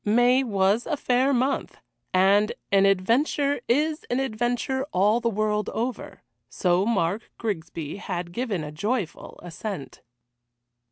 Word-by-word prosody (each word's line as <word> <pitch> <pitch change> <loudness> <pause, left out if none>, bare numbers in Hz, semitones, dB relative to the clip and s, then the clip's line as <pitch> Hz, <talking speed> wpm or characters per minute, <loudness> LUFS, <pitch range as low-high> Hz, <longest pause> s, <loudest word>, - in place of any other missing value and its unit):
May 245 +5 +4
was 205 0 +1
a 300 - -1
fair 255 +1 +2
month, 265 +1 0 0.3
and 195 +3 +4 0.2
an 195 0 +5
adventure 250 +8 +1
is 300 +5 +1
an 245 - +1
adventure 245 +1 -1
all 205 +5 +3
the 235 -1 0
world 210 0 0
over, 240 +3 -4 0.3
so 180 +2 +1
Mark 205 -1 0
Grigsby 165 -7 -4
had 175 -3 -4
given 210 -5 -2
a 150 - -6
joyful 205 +3 -3
assent. 180 -2 -6
215 Hz, 125 wpm, -25 LUFS, 190-250 Hz, 0.3 s, an